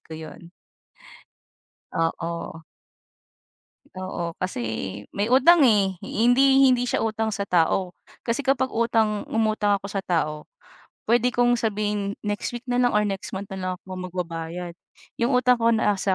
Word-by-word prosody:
ko 160 - -10
'yon. 160 +2 -10 1.4
Oo. 165 0 -3 1.3
Oo, 185 -3 -4
kasi 185 -9 -3 0.5
may 205 +4 -1
utang, 300 +5 +6
eh, 205 -6 +4
hindi 270 +4 +4
hindi 250 -2 +3
siya 245 - 0
utang 220 0 -1
sa 200 -1 -3
tao 180 +1 +1 0.3
kasi 235 +4 0
kapag 270 -1 +2
utang 225 -2 +1
umutang 215 -2 +1
ako 200 - -8
sa 200 -1 -3
tao, 155 -4 -2 0.6
puwede 240 +2 +3
kong 245 0 +3
sabihin 210 -2 -2
next 205 0 -2
week 240 +2 -7
na 245 -1 0
lang 245 - +3
or 210 - +4
next 195 -1 -4
month 195 +1 -5
na - - -6
lang 185 0 -2
ako 185 +1 -10 0.2
magbabayad. 170 0 -5 0.4
'Yong 240 +3 +1
utang 250 -1 +3
ko 230 - +5
nasa 205 -4 +1
210 Hz, 145 wpm, -24 LUFS, 185-240 Hz, 1.4 s, utang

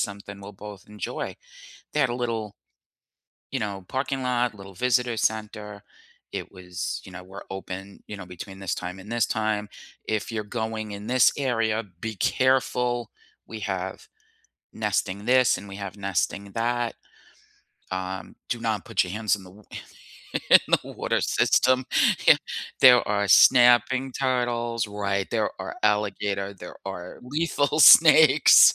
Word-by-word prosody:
something 100 0 -5
we'll 100 +1 -10
both 100 -1 -11
enjoy, 105 0 -5 0.6
they 150 - 0
had 130 - +2
a 120 - -2
little 115 -4 -3 1.0
you 130 - -2
know, 100 -3 -4
parking 135 0 -2
lot, 125 -2 0
little 100 -1 -12
visitor 125 +1 +1
center, 105 -2 -3 0.5
it - - -5
was, 90 -1 -5
you 95 - -12
know, 90 - -9
"We're 95 +2 -11
open, 95 +1 -8
you 105 - -6
know, 95 -3 -9
between 95 +2 -10
this 95 -4 -2
time 90 +2 -6
and 100 +4 -12
this 120 -3 +2
time, 110 -1 -1 0.4
if 110 +1 -2
you're 110 -1 -2
going 110 0 -4
in 100 +1 -8
this 125 0 +4
area, 115 -4 0 0.2
be 110 -2 -5
careful, 125 -1 +1 0.4
we 110 -1 -8
have - - -5 0.7
nesting 100 +2 -2
this 125 -2 +4
and 100 - -11
we 95 - -8
have 100 -1 -6
nesting 100 +1 -2
that. 120 0 -1 1.0
Um, 95 0 -5
do - - -3
not - - -2
put - - +1
your 90 - -6
hands 110 -1 +1
in 100 - -8
the 90 - -14
wa 105 +3 -18 0.7
and - - -1
in - - +10 0.2
the - - -10
water - - -1
system, 130 0 +2 0.4
yeah, - - +9 0.5
there 125 -2 +8
are 100 -1 0
snapping 125 +2 +5
turtles, 120 -4 -1
right, 100 -1 -2
there - - 0
are - - -6
alligator, 100 -1 0
there 90 -2 -11
are 90 -2 -7
lethal 150 +1 -1
snakes." 155 -3 +8
105 Hz, 150 wpm, -25 LUFS, 100-120 Hz, 1.0 s, in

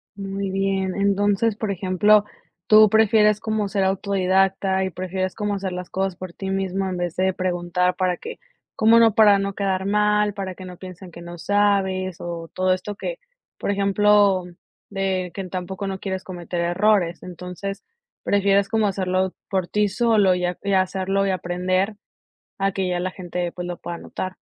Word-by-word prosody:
Muy 195 0 -4
bien, 195 -1 -1
entonces, 200 +2 +1
por 215 -1 -3
ejemplo, 200 +3 +3 0.4
tú 215 0 +7
prefieres 215 -1 +4
como 215 -2 -1
ser 195 0 0
autodidacta 190 0 +1
y 190 - -1
prefieres 185 +1 -3
como 210 -2 -2
hacer 195 -1 -3
las 180 0 -6
cosas 190 -1 -2
por 185 -2 -8
ti 190 +1 -5
mismo 195 0 -1
en 185 - -3
vez 175 -2 -3
de 190 +1 +1
preguntar, 180 0 0
para 180 -1 0
que 470 - -8 0.4
cómo 225 +1 +5
no, 225 -2 +5
para 205 -2 +6
no 195 0 -2
quedar 190 -1 -1
mal, 210 0 +2
para 190 -2 -5
que 185 - -10
no 180 -1 -9
piensen 185 0 -10
que 170 - -11
no 175 0 -9
sabes 190 -2 +1
o 170 -1 -6
todo 185 0 +2
esto 195 +3 -5
que, - - -5 0.4
por - - -2
ejemplo, 200 -1 +3 0.5
de 190 -2 -2
que 195 - -5
en 185 - -7
tampoco 190 +2 -4
no 190 0 -4
quieres 190 -1 -4
cometer 175 -1 -5
errores, 175 0 +1
entonces 180 +2 -7 0.4
prefieres 200 0 +2
como 220 -1 +1
hacerlo 185 -1 0 0.2
por 190 -3 -1
ti 210 +2 +1
solo 210 -3 +3
y 180 - -3 0.3
hacerlo 190 +1 +1
y - - +1
aprender 185 +3 -1 0.6
a 195 0 +1
que 190 -1 -1
ya 180 -1 -1
la 185 +1 -2
gente 180 -1 -4
pues 180 -1 -6
lo 175 0 -4
pueda 170 0 -6
notar. 185 +2 -6
190 Hz, 175 wpm, -22 LUFS, 185-200 Hz, 0.6 s, tú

